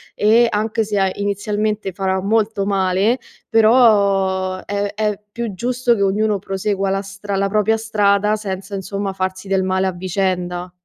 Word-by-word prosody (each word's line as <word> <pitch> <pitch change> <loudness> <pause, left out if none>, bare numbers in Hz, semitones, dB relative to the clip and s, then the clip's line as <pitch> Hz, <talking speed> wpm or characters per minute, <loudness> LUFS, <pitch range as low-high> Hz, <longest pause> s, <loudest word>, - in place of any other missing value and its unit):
e 230 +3 +4
anche 220 +2 0
se 210 -1 -2
a 190 -1 +2
inizialmente 205 0 -2
farà 190 0 -1
molto 215 -1 +1
male, 195 +4 +1 0.3
però 200 -5 +3
è 205 0 -2
è 210 -2 -1
più 235 -2 -4
giusto 245 +4 0
che 200 - -3
ognuno 205 +1 +1
prosegua 195 0 -2
la 195 0 0
stra 195 0 -6
la 195 0 +1
propria 215 +2 +2
strada 210 -1 +2
senza 195 -1 -6
insomma 195 0 -3
farsi 185 0 -4
del 190 -1 +1
male 190 0 0
a 190 - +1
vicenda. 180 -1 -2
200 Hz, 155 wpm, -19 LUFS, 190-215 Hz, 0.3 s, e